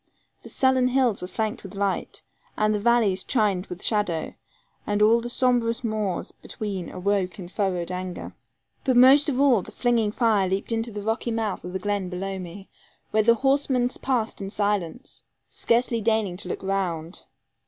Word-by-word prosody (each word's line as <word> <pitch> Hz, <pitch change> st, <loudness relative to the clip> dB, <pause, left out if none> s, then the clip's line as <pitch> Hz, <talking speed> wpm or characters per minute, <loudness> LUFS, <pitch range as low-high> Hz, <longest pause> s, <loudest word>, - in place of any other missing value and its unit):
The -, -, -11 dB
sullen 260 Hz, -1 st, +2 dB
hills 250 Hz, -4 st, +1 dB
were 180 Hz, -, -4 dB
flanked 215 Hz, +2 st, -3 dB
with -, -, -10 dB
light, 200 Hz, -1 st, -2 dB, 0.3 s
and 215 Hz, 0 st, +2 dB
the 210 Hz, -, 0 dB
valleys 215 Hz, -4 st, +2 dB
chined 205 Hz, -7 st, 0 dB
with 180 Hz, +1 st, -7 dB
shadow, 205 Hz, -7 st, 0 dB, 0.5 s
and 205 Hz, 0 st, 0 dB
all 225 Hz, +3 st, +5 dB
the 240 Hz, -, -5 dB
sombrous 245 Hz, -1 st, +1 dB
moors 215 Hz, -5 st, -2 dB
between 195 Hz, -5 st, -6 dB
awoke 185 Hz, 0 st, -1 dB
in 185 Hz, -3 st, -7 dB
furrowed 185 Hz, -2 st, -2 dB
anger. 180 Hz, 0 st, -5 dB, 0.5 s
But 260 Hz, -3 st, +2 dB
most 270 Hz, +4 st, +7 dB
of 265 Hz, -2 st, -1 dB
all 265 Hz, -7 st, +4 dB
the -, -, -11 dB
flinging 235 Hz, -4 st, +1 dB
fire 215 Hz, -5 st, +2 dB
leaped 195 Hz, +4 st, -2 dB
into 225 Hz, +1 st, -1 dB
the 205 Hz, -1 st, -6 dB
rocky 225 Hz, +2 st, -1 dB
mouth 225 Hz, -3 st, -2 dB
of 180 Hz, -, -6 dB
the -, -, 0 dB
glen 205 Hz, -2 st, -2 dB
below 190 Hz, +1 st, -4 dB
me, 185 Hz, +2 st, -9 dB, 0.4 s
where 215 Hz, -, +3 dB
the 230 Hz, +2 st, +5 dB
horsemen 270 Hz, -1 st, +1 dB
passed 240 Hz, -6 st, -1 dB
in 195 Hz, -, -4 dB
silence, 205 Hz, -, -2 dB, 0.3 s
scarcely 235 Hz, 0 st, +1 dB
deigning 215 Hz, -4 st, +1 dB
to -, -, -6 dB
look -, -, -4 dB
round. 180 Hz, -4 st, -3 dB
210 Hz, 175 wpm, -25 LUFS, 190-235 Hz, 0.5 s, most